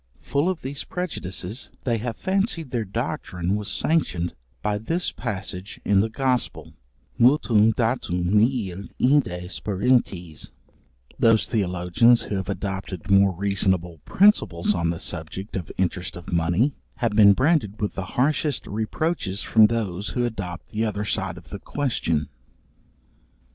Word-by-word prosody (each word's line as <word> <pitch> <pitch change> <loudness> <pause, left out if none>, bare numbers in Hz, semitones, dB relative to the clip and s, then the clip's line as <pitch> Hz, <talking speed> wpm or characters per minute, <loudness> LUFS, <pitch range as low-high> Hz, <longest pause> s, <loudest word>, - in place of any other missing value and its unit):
Full 145 +5 +1
of 185 -3 -3
these 140 +2 -5
prejudices 115 - -5
they 120 -3 0
have 115 +1 -3
fancied 190 - -1
their 120 -3 0
doctrine 100 - -2
was 105 -1 -3
sanctioned 95 - 0 0.3
by 105 -1 0
this 165 +11 -1
passage 95 -3 -5
in 100 -1 +4
the 110 - 0
Gospel, 130 +1 -1 0.5
mutuum 115 -4 +5
date 120 +2 0
nihil 100 +2 +1
inde 125 -10 +2
sperantes: 95 - -1 0.7
Those 110 -4 +4
theologians 95 +3 +3
who 105 - -4
have 95 0 -4
adopted 95 -1 -4
more 100 0 +6
reasonable 95 -3 0
principles 140 - +3
on 85 -3 0
the 85 - -1
subject 85 +6 -5
of 90 -5 -4
interest 90 0 -1
of 90 0 -8
money, 90 - +2 0.2
have 120 -3 0
been 105 -1 +7
branded 130 - +1
with 105 - -1
the 95 - -4
harshest 145 +2 +1
reproaches 110 - -2
from 110 -1 +6
those 105 -4 -2
who 120 - +2
adopt 95 -6 -5
the 110 +1 -1
other 105 -1 -2
side 95 -4 -1
of 85 -1 -14
the 100 - -5
question. 85 - -1
105 Hz, 140 wpm, -24 LUFS, 90-125 Hz, 0.7 s, been